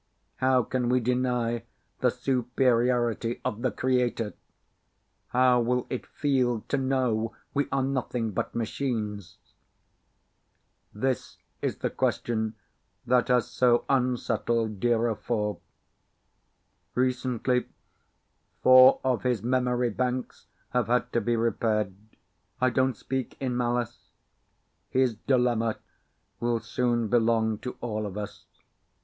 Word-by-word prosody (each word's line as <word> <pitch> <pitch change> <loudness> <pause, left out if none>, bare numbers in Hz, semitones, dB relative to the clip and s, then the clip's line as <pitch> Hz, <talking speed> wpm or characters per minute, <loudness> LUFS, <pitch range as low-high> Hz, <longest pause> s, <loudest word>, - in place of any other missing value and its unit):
How 130 -1 +3
can 125 +1 -1
we 125 +1 +3
deny 125 -1 0 0.4
the - - +3
superiority 120 -2 +1
of 110 - -2
the 130 - +2
Creator? 125 -4 0 0.9
How 125 0 +4
will 125 +1 0
it 130 - -4
feel 130 -5 0
to 145 - +1
know 125 -4 0 0.2
we 145 0 +1
are 135 -1 +1
nothing 125 -4 -1
but 95 - -3
machines? 110 -5 -3 1.5
This 130 +4 -2 0.2
is - - -1
the - - -2
question 110 -2 -1 0.5
that 125 0 +3
has 125 -2 +3
so 120 -1 +2
unsettled 120 -4 0
DIRA 120 +1 +2
IV. 105 -1 -2 1.4
Recently 125 -1 0 1.0
four 130 +1 +8
of 130 -2 +1
his 125 -5 0
memory 125 -1 +1
banks 125 +2 -3 0.2
have 125 -3 +1
had 125 +1 +1
to 120 - +2
be 120 +2 +1
repaired. 110 -3 0 0.7
I 130 0 +3
don't 130 -1 +1
speak 130 +2 -4
in 130 -2 -2
malice. 120 -1 -2 0.8
His 130 -2 +2
dilemma 120 -1 +1 0.6
will 120 -1 0
soon 120 0 0
belong 110 -1 +2
to 125 - -6
all 110 -3 -2
of 100 0 -7
us. 105 -1 -7
120 Hz, 115 wpm, -27 LUFS, 115-125 Hz, 1.5 s, four